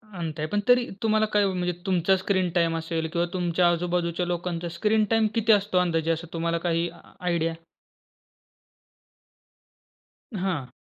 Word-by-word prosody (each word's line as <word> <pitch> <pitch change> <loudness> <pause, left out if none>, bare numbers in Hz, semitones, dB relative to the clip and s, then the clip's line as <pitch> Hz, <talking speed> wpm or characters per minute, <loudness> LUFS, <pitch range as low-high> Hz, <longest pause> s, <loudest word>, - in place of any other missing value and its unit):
अंत 160 -3 -5
आहे. 155 - -1
पण 205 +6 0
तरी 245 -1 +5 0.2
तुम्हाला 215 0 +3
काय 205 -1 +4
ओ 190 - 0
म्हणजे 180 -1 -1
तुमचा 185 0 +3
स्क्रीन 185 -1 0
टाईम 165 -1 +2
असेल 165 0 -2
किंवा 170 0 +1
तुमच्या 175 -1 +2
आजूबाजूच्या 175 0 -1
लोकांचा 175 -1 -3
स्क्रीन 215 +3 +2
टाईम 225 -1 +4
किती 225 0 +3
असतो 205 -3 +3
अंदाजे 165 -2 +1
असं 165 +1 -4
तुम्हाला 170 0 -1
काही 170 +1 +1 0.3
आयडिया? 170 -2 0 2.8
हां. 175 -9 -2
175 Hz, 145 wpm, -26 LUFS, 165-190 Hz, 2.8 s, तरी